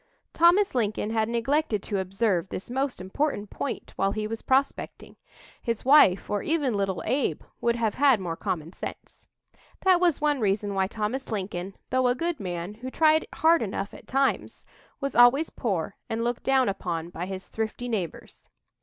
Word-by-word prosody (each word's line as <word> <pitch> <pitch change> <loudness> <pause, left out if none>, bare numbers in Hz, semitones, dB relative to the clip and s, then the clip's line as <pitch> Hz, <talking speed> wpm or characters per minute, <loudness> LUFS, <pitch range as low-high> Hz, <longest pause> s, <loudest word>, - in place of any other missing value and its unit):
Thomas 350 +5 +4
Lincoln 215 -3 -1
had 220 -1 +1
neglected 235 -1 0
to 200 -3 -2
observe 190 -1 0
this 195 - -6
most 265 +1 -1
important 205 +2 -2
point 280 - -5
while 195 0 +1
he 215 0 -2
was 225 +1 -4
prospecting. 270 +1 -1 0.5
His 230 -2 -3
wife, 265 -9 +6
or 205 -1 -1
even 295 -6 0
little 195 -2 -1
Abe, 260 +4 0 0.2
would 235 0 +2
have 225 -3 0
had 275 -5 +4
more 175 -3 -3
common 165 0 -4
sense. - - -9 0.5
That 370 -2 +5
was 350 -4 +2
one 295 -2 +1
reason 205 -1 0
why 190 -1 +1
Thomas 220 +6 -3
Lincoln, 190 -2 -4 0.2
though 255 0 +3
a 245 - +2
good 335 +1 -2
man, 180 0 -4
who 245 +4 -7
tried 315 +3 +3
hard 330 +1 +4
enough 200 -1 -3
at - - -13
times, 270 +1 0 0.3
was 275 -1 -3
always 245 +6 +6
poor 195 -5 -2
and 225 +1 -1
looked 240 0 -1
down 265 -2 +3
upon 175 -4 -3
by 175 +1 -5
his 190 0 -6
thrifty 220 +2 -4
neighbors. 195 -9 -5
225 Hz, 170 wpm, -26 LUFS, 195-270 Hz, 0.5 s, wife